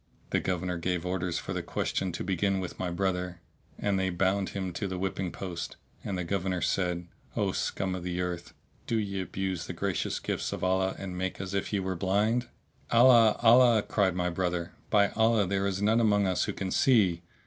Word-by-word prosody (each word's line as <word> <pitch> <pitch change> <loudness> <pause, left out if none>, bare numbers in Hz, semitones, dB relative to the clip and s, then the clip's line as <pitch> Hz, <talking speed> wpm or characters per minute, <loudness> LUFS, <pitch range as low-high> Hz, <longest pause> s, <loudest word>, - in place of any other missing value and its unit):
The - - +3
Governor 90 -1 -2
gave 90 0 -1
orders 90 -2 -1
for - - -4
the - - -2
question 95 -1 -2
to - - -4
begin 95 +1 0
with 95 - -6
my 90 - -1
brother, 90 -1 -2 0.4
and 100 -2 0
they 95 0 +1
bound 95 +2 +1
him 95 -2 -4
to 100 +4 -3
the 95 -1 -4
whipping 95 -1 -2
post,[FN#655] 90 0 -7
and 95 - -2
the 90 - -2
Governor 95 0 -1
said, 90 -1 -1 0.3
"O - - +1
scum 95 -1 -2
of 90 - -4
the 90 0 -3
earth, 90 -1 -4 0.3
do 115 - +1
ye 100 -3 -2
abuse 95 -2 -3
the - - -4
gracious 95 +1 -1
gifts - - -2
of - - -5
Allah 95 +1 +1
and 95 -2 -6
make 95 +1 -3
as 95 0 -5
if 100 0 -1
ye 100 - +1
were 95 0 -2
blind!" 105 +7 +1 0.4
"Allah! 115 -2 +6
Allah!" 120 -2 +6
cried 95 -4 +1
my 90 -1 0
brother, 90 -1 -2 0.2
"by 100 -2 +4
Allah, 110 -2 +3
there 100 +1 0
is 100 +1 -2
none 110 +3 +4
among 105 -3 +3
us 95 -1 +1
who - - -3
can 95 -1 -4
see." 100 -10 +3
95 Hz, 205 wpm, -29 LUFS, 90-100 Hz, 0.4 s, Allah